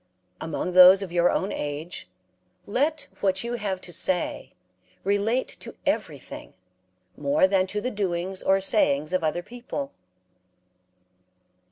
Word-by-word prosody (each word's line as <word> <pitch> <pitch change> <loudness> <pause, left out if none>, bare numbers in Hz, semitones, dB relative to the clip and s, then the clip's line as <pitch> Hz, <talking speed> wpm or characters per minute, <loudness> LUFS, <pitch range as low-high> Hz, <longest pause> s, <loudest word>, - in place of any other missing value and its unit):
Among 160 +3 -3
those 185 +2 +8
of 185 - -7
your 175 0 +3
own 190 - -1
age 150 - -5 0.6
let 290 +7 0
what 190 0 +1
you 235 +1 -3
have 200 -5 -2
to 175 - -9
say 180 0 -1 0.5
relate 205 +6 +1
to - - -9
everything - - -3 0.6
more 145 +4 +2
than 190 -1 +2
to 210 +2 -2
the 250 +4 -3
doings 185 -2 -2
or 195 0 +3
sayings 155 -6 +1
of 185 -2 +1
other 160 +3 -1
people. 250 +5 -6
190 Hz, 130 wpm, -25 LUFS, 175-210 Hz, 0.6 s, those